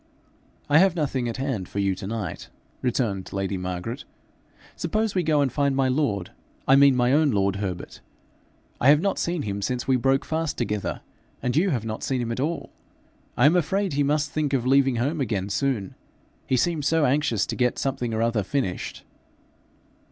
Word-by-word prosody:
'I 150 +1 +5
have 190 -1 +4
nothing 135 -6 -1
at 115 - -5
hand 130 -9 -3
for - - -8
you 100 -1 +2
to 95 +1 -7
night,' 110 -5 -5 0.3
returned 115 -7 -1
lady 95 0 -2
Margaret. 90 +7 -4 0.7
'Suppose 215 +5 -1
we 185 - +1
go 155 -3 +2
and 135 -3 +1
find 140 -1 +1
my 135 -1 +2
lord; 125 - 0 0.4
I 135 - +7
mean 140 -1 +6
my 125 +1 +3
own 150 0 +4
lord 100 -4 +1
Herbert. 95 -3 -5 0.8
I 130 - +4
have 150 +1 +7
not 195 +4 0
seen 170 -3 -1
him 100 -2 -3
since 125 +4 -2
we 130 -1 +4
broke 135 +2 +1
fast 160 -1 -2
together, 105 -4 -2 0.4
and 125 0 0
you 180 +6 +3
have 120 - -1
not 110 0 -4
seen 130 -2 -1
him 120 -1 -2
at 115 - -3
all. 160 +5 -2 0.7
I 120 - +4
am 155 +4 +6
afraid 190 +2 +1
he 145 - +1
must 145 +1 +1
think 150 -2 -1
of 125 -3 +1
leaving 135 -1 +4
home 140 +6 -1
again 105 -6 -1
soon, 110 -3 -1 0.5
he 130 - +2
seems 150 +2 0
so 160 -1 +3
anxious 135 -5 +1
to - - -4
get 125 -1 +1
something 130 -3 -2
or 110 0 0
other 115 -2 +1
finished.' 100 -3 -3
130 Hz, 190 wpm, -25 LUFS, 110-145 Hz, 0.8 s, I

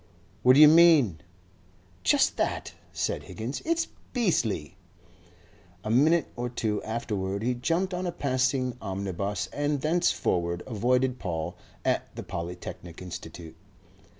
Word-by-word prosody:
"What 125 +1 +6
do - - +6
you 155 - +11
mean?" 150 - +6 0.8
"Just 90 - +3
that," - - -2 0.2
said - - -2
Higgins. 115 +5 -6
"It's 335 +1 +1 0.3
beastly!" 115 - 0 1.1
A 110 - -2
minute 155 +7 +4
or 120 +1 -3
two 110 -3 -2
afterward 105 -3 -3
he 125 +2 +1
jumped 165 +10 -1
on 180 0 -2
a - - -1
passing 130 -3 0
omnibus, 100 0 -3
and 145 0 0
thenceforward 90 - +1
avoided 125 +2 +1
Paul 85 -1 -3 0.3
at - - -1
the - - -6
Polytechnic 85 0 -7
Institute. 85 -2 -8
120 Hz, 125 wpm, -27 LUFS, 95-145 Hz, 1.1 s, you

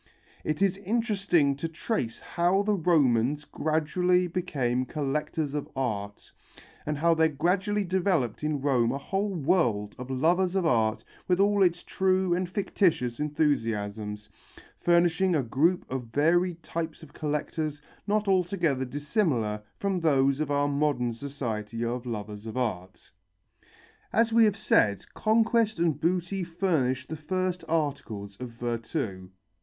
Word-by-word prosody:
It 155 +4 0
is 195 -1 +2
interesting 195 - +1
to 165 - -3
trace 160 - -3
how 180 +3 +1
the 210 +1 +1
Romans 150 - +2
gradually 180 +4 +1
became 140 -9 -1
collectors 150 +1 -2
of 150 -1 -3
art, 105 -6 -3 0.6
and 150 -1 -1
how 165 +3 +3
there 160 0 +3
gradually 185 +7 0
developed 175 - 0
in 150 -2 -1
Rome 125 -5 +2
a 135 - -2
whole 195 +6 -2
world 135 - +1
of 125 +1 -7
lovers 175 +8 +2
of 190 -3 +1
art 110 -7 +2 0.2
with 180 0 +2
all 200 0 +3
its 175 -2 +3
true 190 -1 +1
and 180 0 -1
fictitious 175 - 0
enthusiasms, 110 -9 -1 0.5
furnishing 175 +1 +3
a 145 - +1
group 155 +10 +1
of 130 -1 -4
varied 170 +6 +1
types 165 -1 -4
of 145 -2 -14
collectors 150 0 -3 0.3
not 210 0 +1
altogether 175 -8 +1
dissimilar 140 - -1 0.2
from 195 -2 -1
those 140 -4 +3
of 155 -2 -1
our 145 0 +2
modern 140 -4 0
society 115 -4 -4
of 120 +1 -3
lovers 105 -1 -5
of 110 - -6
art. 95 -7 -4 1.0
As 230 +2 +2
we 230 0 +6
have 205 -2 +1
said, 105 - +2
conquest 225 -1 +2
and 165 -4 +1
booty 180 +2 0
furnished 160 -8 0
the 160 - -4
first 185 +3 -2
articles 135 -11 -2
of 125 -1 -5
virtu. 115 - -4
155 Hz, 140 wpm, -27 LUFS, 125-180 Hz, 1.0 s, we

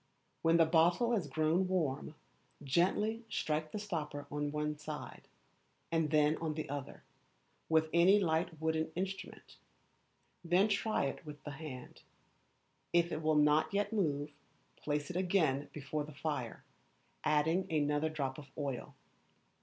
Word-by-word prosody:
When 165 +1 +4
the 165 - +6
bottle 175 +8 +3
has 200 -10 +1
grown 155 +6 +2
warm, 155 -5 -1 0.5
gently 200 - +1
strike 155 -7 -1
the - - -4
stopper 155 -8 -4
on 145 0 -2
one 150 0 -1
side, 150 0 -7 0.6
and 165 -2 +1
then 150 0 +3
on 160 -2 -3
the 155 - -4
other, 140 -1 -6 0.7
with 160 0 +4
any 180 +4 +6
light 160 -2 0
wooden 160 0 0
instrument; 190 +2 -5 0.9
then 180 +5 +3
try 215 +2 +1
it 135 - -4
with 150 -2 -10
the 150 - -6
hand: 135 -4 -8 0.9
if 170 0 +3
it 155 - -2
will 155 0 +2
not 150 +1 +4
yet 205 +2 0
move, 150 -8 0 0.4
place 150 +1 -2
it - - -9
again 175 -7 +1
before 150 +1 -3
the 145 -1 -10
fire, 140 -5 -3 0.6
adding 160 +5 +2
another 150 0 +1
drop 140 -3 -3
of 145 - -11
oil. 140 -4 -4
155 Hz, 140 wpm, -34 LUFS, 150-175 Hz, 0.9 s, the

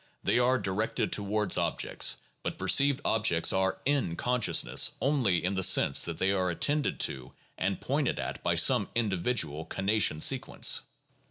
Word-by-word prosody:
They - - +1
are 125 +1 +2
directed 105 0 -3
towards 105 +1 -1
objects; - - 0 0.2
but - - -6
perceived 140 -1 +2
objects 105 -7 +2
are 95 0 -1
"in" 135 -12 -1
consciousness 125 +4 +1
only 120 - 0
in 95 - -1
the 95 - -2
sense 95 +1 +4
that 85 -1 -6
they 95 - 0
are 95 -2 -1
attended 145 - -2
to 65 -1 -2 0.2
and 95 0 -3
pointed 140 0 -2
at - - -6
by - - -1
some - - +3
individual 95 -7 -1
conation 95 -3 0
sequence. - - +2
100 Hz, 150 wpm, -28 LUFS, 90-125 Hz, 0.2 s, sense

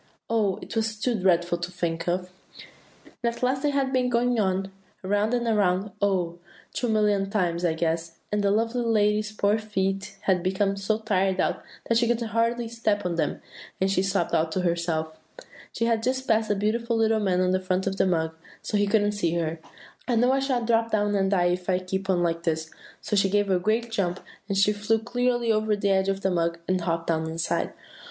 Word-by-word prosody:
Oh, 210 -4 +1
it - - -8
was 220 -1 -1
too 245 +3 +1
dreadful 175 -4 +2
to 175 +1 -4
think 170 -2 -3
of! 180 +1 -1 0.9
"And 235 0 0
at - - -9
last 260 +1 +1
they 295 - +1
had 275 -2 0
been 250 -1 +2
going 245 0 +1
on 190 -1 0 0.3
so, - - -6
around 205 +4 +1
and 240 -1 -1
around, 200 -3 +1
oh! 180 -4 0 0.3
two 245 - -1
million 210 -2 +2
times, 180 -4 0
I 170 -2 +2
guess; 165 0 -2
and 210 0 +1
the 200 - +3
lovely 230 +4 +1
lady's 215 -2 +2
poor 205 -1 +1
little 215 0 -3
feet 195 -1 -2
had 185 -2 +2
become 195 +2 0
so 200 +2 0
tired 195 -4 0
out, - - 0 0.3
that 230 0 +3
she 235 - +2
could 235 0 +1
hardly 230 +1 0
step 220 -3 -1
on 180 - 0
them, 170 - -2 0.4
and 190 +1 +1
she 185 - +2
sobbed 195 -3 0
out 160 0 +2
to 185 - 0
herself, 170 -2 -1 0.6
she 230 - -1
had 230 -1 +1
just 260 +2 -1
passed 220 -1 +2
the 205 - +2
beautiful 230 +3 0
little 225 0 +3
man 190 -3 +1
on 185 0 +2
the 185 - +2
front 185 0 -1
of 195 0 -2
the - - +3
mug, 160 -3 0 0.3
so 210 - -1
he 205 0 +2
couldn't 205 0 +2
see 170 -5 -1
her, 165 -1 -2 0.5
'I 245 - +1
know 245 +3 +4
I 270 - +2
shall 260 -3 0
drop 230 0 +2
down 205 -2 +1
and 195 -1 +2
die, 180 -3 +3
if 180 +1 -5
I 185 - +3
keep 190 +1 -4
on 180 -2 +2
like 170 -1 0
this;' 160 -2 -2 0.3
so - - -2
she 195 -1 +3
gave 205 0 +1
a 185 - +3
great 225 +5 0
jump, 185 -4 -1 0.3
and 195 - 0
she 200 +2 +4
flew 210 +2 +1
clear 245 +3 0 0.2
over 215 0 +1
the 200 -1 0
edge 190 0 +2
of 195 0 -1
the 190 - +1
mug, 170 -1 0
and 185 -1 +1
hopped 165 -1 -1
down 160 -1 0
inside." 165 0 -1
200 Hz, 220 wpm, -26 LUFS, 180-225 Hz, 0.9 s, know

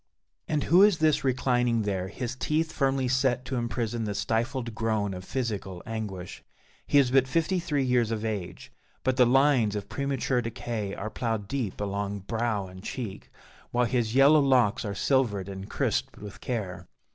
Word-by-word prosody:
And 150 -2 0
who 175 +4 +5
is 205 -3 +6
this 155 -3 +2
reclining 125 -3 +1
there, 95 -3 -2
his 120 +5 -5
teeth 155 +4 0
firmly 135 -2 +1
set 130 0 +1
to 130 +1 -3
imprison 120 -1 -2
the 105 -1 -3
stifled 115 +4 -1
groan 110 -3 -1
of 90 0 -7
physical 105 -7 -4
anguish? 105 -5 -6 0.4
He - - +3
is 135 -3 +4
but 135 -1 +4
fifty 165 +6 +1
three 150 -5 0
years 125 -3 +2
of 110 -1 -2
age, 105 -5 -5 0.3
but 130 0 +1
the 125 -2 +5
lines 130 -5 +4
of 100 -1 -5
premature 135 -2 -1
decay 115 -3 -4
are 110 +2 -5
ploughed 110 -3 -2
deep 120 -5 -3
along 100 0 -3
brow 110 -1 -1
and 95 0 -11
cheek, 110 -7 -6 0.4
while 120 0 +2
his 115 -1 0
yellow 140 +3 +7
locks 125 -8 +3
are 100 -2 -4
silvered 110 -7 +1
and 95 0 -7
crisped - - -1
with 105 -1 -10
care. 95 -7 -4
120 Hz, 170 wpm, -27 LUFS, 105-130 Hz, 0.4 s, yellow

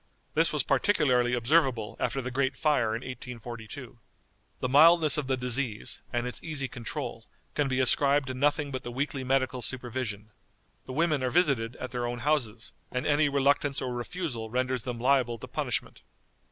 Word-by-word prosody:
This - - +3
was - - 0
particularly 125 - +2
observable 125 -3 +2
after 135 - -1
the 125 - -4
great 135 +1 0
fire 130 -8 +2
in 115 - -4
1842." 120 0 -8 0.6
_The - - -1
mildness 155 +3 +6
of 140 - -4
the 130 -1 +1
disease, 125 -3 -2
and 120 0 -1
its 125 - -4
easy 150 -4 -3
control, 120 -4 -6 0.3
can 145 -2 +1
be 130 -1 0
ascribed 140 +2 +4
to - - -2
nothing 145 +2 +1
but 130 -1 -3
the 120 - -6
weekly 135 +1 -2
medical 130 -1 0
supervision. 120 -4 -3 0.6
The 130 - -6
women 155 -1 +1
are 130 - +1
visited 135 -8 +2
at 130 - -6
their 120 -1 -2
own 120 0 -3
houses, 120 -4 -1 0.2
and 125 0 -2
any 145 0 +3
reluctance 140 0 +2
or 130 -2 -3
refusal 120 -3 -4
renders 130 +1 0
them 120 -1 -5
liable 125 -2 +2
to - - -9
punishment. - - -3
130 Hz, 170 wpm, -28 LUFS, 120-140 Hz, 0.6 s, mildness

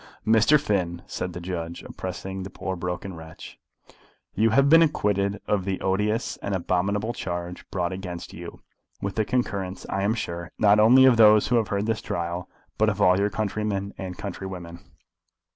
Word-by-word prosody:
"Mr. 115 +7 +5
Finn," 90 - -1
said 90 - -4
the 90 - -6
judge, 85 -1 -5
addressing 95 +1 -6
the 95 - -6
poor 95 0 -4
broken 90 +2 -4
wretch, 80 0 -11 0.7
"you 110 +3 +3
have 135 +5 +4
been 165 +3 +7
acquitted 100 - +1
of 100 -3 0
the 95 0 -2
odious 105 +4 0
and 100 -1 -3
abominable 100 +5 0
charge 90 -2 -5
brought 90 -1 -2
against 90 -2 -7
you, - - -9 0.4
with 100 -1 -3
the 110 - +1
concurrence, 100 -6 -2
I 95 - -1
am 105 +3 +1
sure, 85 -5 -5
not 105 0 +5
only 125 +5 +7
of 125 -3 +6
those 105 -1 +6
who 120 - +3
have 110 -3 +1
heard 100 +1 -1
this 110 -1 -1
trial, 85 +1 -4 0.3
but 110 0 +4
of 100 -1 -3
all 90 -2 +4
your 100 +1 +2
countrymen 100 -1 -2
and 90 -2 -6
countrywomen. 90 -3 -7
100 Hz, 175 wpm, -25 LUFS, 90-105 Hz, 0.7 s, been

